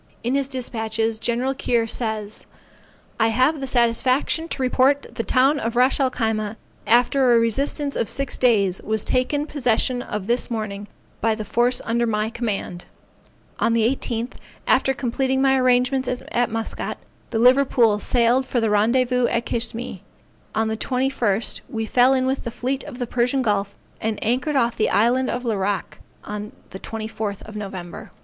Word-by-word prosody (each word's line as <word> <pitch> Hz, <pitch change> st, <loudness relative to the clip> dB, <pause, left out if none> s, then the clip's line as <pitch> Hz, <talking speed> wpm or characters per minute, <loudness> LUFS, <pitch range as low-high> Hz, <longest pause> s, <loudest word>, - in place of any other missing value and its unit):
In 240 Hz, +2 st, 0 dB
his 275 Hz, -1 st, +1 dB
despatches 225 Hz, -4 st, -2 dB
Gen. 245 Hz, +3 st, -1 dB
Keir 240 Hz, -3 st, 0 dB
says 220 Hz, -2 st, -2 dB, 0.7 s
I 225 Hz, -, +4 dB
have 255 Hz, +7 st, +2 dB
the 270 Hz, -, -4 dB
satisfaction 255 Hz, +6 st, +1 dB
to 285 Hz, -, -4 dB
report 265 Hz, +2 st, +2 dB
the -, -, -2 dB
town 270 Hz, +5 st, +3 dB
of 230 Hz, -1 st, -3 dB
Ras 255 Hz, +4 st, +3 dB
el 265 Hz, -2 st, +3 dB
Khyma, 220 Hz, -3 st, -2 dB, 0.3 s
after 245 Hz, +2 st, +4 dB
a -, -, +5 dB
resistance 275 Hz, +5 st, 0 dB
of 230 Hz, -, -1 dB
six 275 Hz, -1 st, -1 dB
days, 200 Hz, -7 st, +2 dB
was 220 Hz, -1 st, -1 dB
taken 285 Hz, +4 st, +1 dB
possession 250 Hz, -3 st, 0 dB
of 210 Hz, -5 st, -5 dB
this 240 Hz, +3 st, 0 dB
morning 210 Hz, -3 st, -4 dB, 0.3 s
by 225 Hz, -1 st, +2 dB
the 215 Hz, -1 st, -6 dB
force 240 Hz, +4 st, +2 dB
under 235 Hz, +1 st, +1 dB
my 215 Hz, 0 st, -1 dB
command. 205 Hz, -7 st, -4 dB, 0.7 s
On 230 Hz, -, +2 dB
the 225 Hz, -1 st, +3 dB
18th, 235 Hz, -1 st, -4 dB, 0.3 s
after 270 Hz, 0 st, +3 dB
completing 265 Hz, +2 st, -1 dB
my 270 Hz, 0 st, +4 dB
arrangements 255 Hz, +1 st, +2 dB, 0.2 s
at 240 Hz, -1 st, +1 dB
Muscat, 225 Hz, 0 st, -3 dB, 0.3 s
the 225 Hz, -, -2 dB
Liverpool 245 Hz, -3 st, +4 dB
sailed 240 Hz, +3 st, +2 dB
for 245 Hz, -, 0 dB
the 225 Hz, -2 st, +1 dB
rendezvous 245 Hz, +4 st, +2 dB
at 235 Hz, 0 st, -1 dB
Kishme; 230 Hz, -3 st, -2 dB, 0.6 s
on 220 Hz, +1 st, +1 dB
the 220 Hz, 0 st, -2 dB
21st, 250 Hz, -5 st, 0 dB
we 225 Hz, -1 st, -3 dB
fell 250 Hz, +4 st, +4 dB
in 260 Hz, 0 st, +1 dB
with 265 Hz, +1 st, -1 dB
the 235 Hz, -, -3 dB
fleet 260 Hz, +3 st, -3 dB
of 290 Hz, -4 st, -9 dB
the 245 Hz, -, -2 dB
Persian 250 Hz, +3 st, 0 dB
Gulf 200 Hz, -2 st, 0 dB, 0.3 s
and 220 Hz, -1 st, -1 dB
anchored 255 Hz, +6 st, 0 dB
off 235 Hz, -3 st, +2 dB
the 215 Hz, -, +1 dB
island 245 Hz, +4 st, +2 dB
of 245 Hz, +1 st, -3 dB
Larrack 205 Hz, -4 st, -2 dB, 0.2 s
on 210 Hz, 0 st, -6 dB, 0.2 s
the 190 Hz, -, -8 dB
24th 215 Hz, -1 st, -5 dB
November. 195 Hz, -4 st, -7 dB
235 Hz, 165 wpm, -22 LUFS, 220-255 Hz, 0.7 s, a